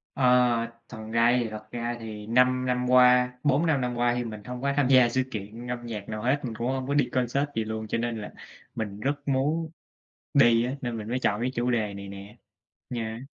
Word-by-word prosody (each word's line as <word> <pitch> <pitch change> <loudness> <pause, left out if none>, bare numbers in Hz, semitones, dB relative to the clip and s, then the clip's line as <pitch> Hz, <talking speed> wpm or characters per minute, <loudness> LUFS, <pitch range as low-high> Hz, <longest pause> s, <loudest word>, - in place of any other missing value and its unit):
Ờ. 125 -3 +3 0.2
Thật 120 - -9 0.2
ra 115 +2 +4
thì 115 -2 -2
thật 110 0 -9
ra 120 0 -3
thì 105 -2 -8
5 125 +2 +3
năm 125 0 0
qua 125 0 +5
4-5 145 0 +2
năm 125 -1 -2
qua 120 0 +2
thì 125 - -1
mình 110 -3 -7
hông 125 +3 -7
có 140 +1 0
tham 145 -3 +3
gia 130 -2 +6
sự 130 +2 +1
kiện 110 +3 -7
âm 120 -1 -4
nhạc 105 -4 -6
nào 110 -1 -4
hết, 130 +5 +1
mình 115 - -4
cũng 115 +2 -3
hông 130 0 -2
có 140 - 0
đi 145 -4 +2
concert 130 +3 0
gì 115 - 0
luôn, 110 0 -5
cho - - -1
nên 115 -1 -2
là 105 - -7 0.4
mình 105 -2 -4
rất 140 +5 -3
muốn 145 +4 0 0.6
đi 120 -4 +5
á, 130 +2 -3
nên 120 -2 -3
mình 105 -1 -6
mới 125 +2 -1
chọn 105 -2 0
cái 125 +1 0
chủ 120 +1 0
đề 110 -4 0
này 100 0 -8
nè 100 +3 -10 0.5
nha. 115 -1 -4
120 Hz, 230 wpm, -27 LUFS, 110-130 Hz, 0.6 s, gia